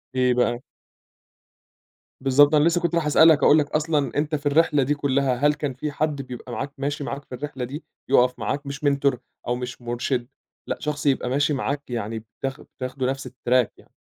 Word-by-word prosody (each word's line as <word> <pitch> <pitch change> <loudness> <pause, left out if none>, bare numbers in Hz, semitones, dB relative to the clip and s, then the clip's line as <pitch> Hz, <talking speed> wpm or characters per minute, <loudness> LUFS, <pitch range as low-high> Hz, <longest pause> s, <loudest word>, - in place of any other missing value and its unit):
إيه 125 -1 +3
بقى؟ 120 -1 +1 1.6
بالضبط، 145 +3 +5
أنا 150 - +5
لسه 170 +2 +2
كنت 170 0 0
رايح 165 -3 +1
أسألك 155 0 +6
أقول 150 - +7
لك 145 - -2
أصلًا 150 -4 0
أنت 150 +1 0
في 145 0 -6
الرحلة 145 -1 +3
دي 145 +3 +1
كلّها 140 -2 +1
هل 145 +4 +3
كان 145 -3 -3
في 150 +4 -4
حد 150 -1 -1
بيبقى 125 -1 -9
معاك 135 +3 -4
ماشي 145 +1 -2
معاك 140 +1 -5
في 125 - -8
الرحلة 140 -1 -5
دي 140 +6 -7 0.3
يقف 125 -2 +3
معاك؟ 145 +1 -2
مش 140 +1 -6
mentor 140 -2 +2 0.3
أو 120 - +1
مش 125 0 -6
مرشِد، 120 +1 -2 0.4
لأ - - -2
شخص 150 -1 -3
يبقى 135 -3 +1
ماشي 145 +3 +1
معاك 140 +1 -3
يعني 115 -2 -3
بتاخ 135 +4 -6
بتاخدوا 130 0 -4
نَفْس 135 0 -4
الtrack 125 -2 +1
يعني؟ - - -21
140 Hz, 190 wpm, -24 LUFS, 125-150 Hz, 1.6 s, أقول